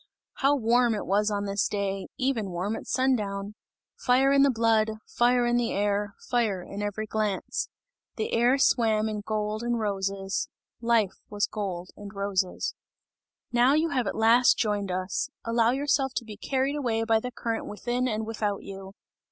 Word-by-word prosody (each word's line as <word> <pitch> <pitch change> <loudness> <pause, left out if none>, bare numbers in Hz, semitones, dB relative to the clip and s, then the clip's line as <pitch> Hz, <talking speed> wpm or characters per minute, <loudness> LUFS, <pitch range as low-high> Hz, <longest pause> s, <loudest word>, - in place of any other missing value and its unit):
How 280 +1 +3
warm 240 -2 +3
it 210 - -4
was 205 +2 +2
on 205 -1 -1
this 200 0 0
day, 195 -1 -2
even 255 -6 0
warm 185 +5 -2
at - - -8
sundown! 210 -6 0 0.4
Fire 265 +2 +3
in 280 0 +5
the 280 - +6
blood, 225 -2 +2
fire 245 0 +2
in 240 0 +2
the 240 -1 0
air, 205 0 0
fire 225 -7 0
in 200 +3 -7
every 205 +1 -3
glance. 215 -2 -2 0.5
The 220 - -3
air 240 +3 +4
swam 220 -5 +3
in 215 -1 -3
gold 215 +1 -2
and 240 0 0
roses, 195 -2 -2 0.3
life 230 -4 +2
was 205 0 0
gold 185 -4 -5
and 205 -1 -9
roses. 195 -2 -1 0.8
"Now 245 +3 +4
you 320 +2 +2
have 255 -7 0
at - - -2
last 230 +3 +5
joined 205 -3 0
us! 185 +8 -2 0.2
Allow 230 0 +3
yourself 270 0 +1
to 235 - -2
be 215 -2 -8
carried 265 +5 -1
away 230 -5 0
by 225 -1 +3
the 250 - -4
current 230 -2 -3
within 245 +4 -2
and 220 -2 -2
without 210 -2 -2
you!" 195 0 -9
220 Hz, 170 wpm, -27 LUFS, 200-240 Hz, 0.8 s, the